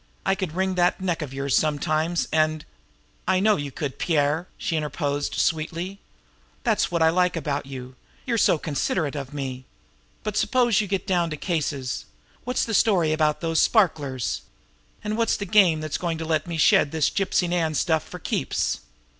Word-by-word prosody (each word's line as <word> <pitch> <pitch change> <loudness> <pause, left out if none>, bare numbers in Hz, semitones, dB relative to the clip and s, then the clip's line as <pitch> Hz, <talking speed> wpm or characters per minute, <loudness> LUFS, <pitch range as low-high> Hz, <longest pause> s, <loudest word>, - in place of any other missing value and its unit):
"I - - +3
could 190 -5 -3
wring 190 0 0
that 180 -1 +2
neck 180 -3 -1
of 145 -4 -5
yours 135 0 -1
sometimes, 155 +2 +1
and 155 -1 +1 0.3
" - - -37
"I 185 - +3
know 210 +2 +4
you 145 -2 -4
could, 145 -2 -5
Pierre," 155 +1 +1
she 165 - -2
interposed 145 -1 -2
sweetly. 170 +4 -1 0.6
"That's - - +2
what 170 -2 +1
I 160 - +5
like 180 +1 +2
about 145 -3 -2
you 130 -1 -8 0.3
you're 235 -3 0
so 170 - +4
considerate 150 0 -1
of 140 -2 -5
me! 130 -3 -5 0.6
But 215 -1 -3
suppose 240 -3 +3
you 210 - -3
get 195 0 -2
down 175 -3 +1
to 155 - -4
cases. 145 -7 -2 0.4
What's 250 +1 0
the 225 - -4
story 180 -7 +3
about 155 -1 +1
those 165 -1 +2
sparklers? 145 - +1 0.6
And 210 +1 -2
what's 230 - +2
the 200 - -4
game 185 -6 +4
that's 155 0 -3
going 170 -2 -2
to 160 - -4
let 155 0 0
me 170 -1 -3
shed 155 - +5
this 160 -2 +1
Gypsy 190 -2 +1
Nan 165 -3 0
stuff 160 +1 +2
for - - -10
keeps?" - - -1
160 Hz, 180 wpm, -24 LUFS, 145-185 Hz, 0.6 s, I